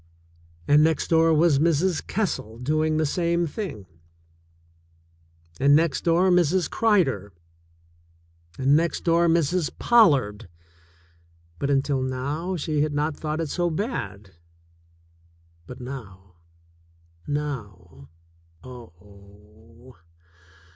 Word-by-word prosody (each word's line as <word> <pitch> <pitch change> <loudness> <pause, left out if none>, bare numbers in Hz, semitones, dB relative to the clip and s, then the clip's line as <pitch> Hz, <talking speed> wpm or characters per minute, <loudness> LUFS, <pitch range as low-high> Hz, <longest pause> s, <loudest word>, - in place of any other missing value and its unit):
And 150 +1 +5
next 160 -1 0
door 165 0 +4
was 155 -2 +3
Mrs. 165 +2 +1
Kessel 170 - -3
doing 155 +5 0
the 155 - +1
same 170 +2 0
thing. 150 - -6 1.7
And 140 +2 +5
next 160 -2 +1
door 175 +2 +3
Mrs. 180 0 +2
Cryder. 135 - +1 1.2
And 135 +2 +3
next 170 +2 0
door 170 0 +3
Mrs. 165 0 +1
Pollard. 135 - +3 1.1
But, 140 - -2
until 135 -1 0
now, 140 +8 -3
she 155 -2 -2
had 150 0 -1
not 150 +1 -1
thought 155 +1 -4
it 160 - -4
so 175 +2 -1
bad. 115 - -5 1.4
But 125 - -10
now 95 -9 -10 0.4
— 85 0 -33
now 100 - -6 0.5
— - - -25
oh 105 +1 -16
145 Hz, 105 wpm, -24 LUFS, 110-165 Hz, 1.7 s, And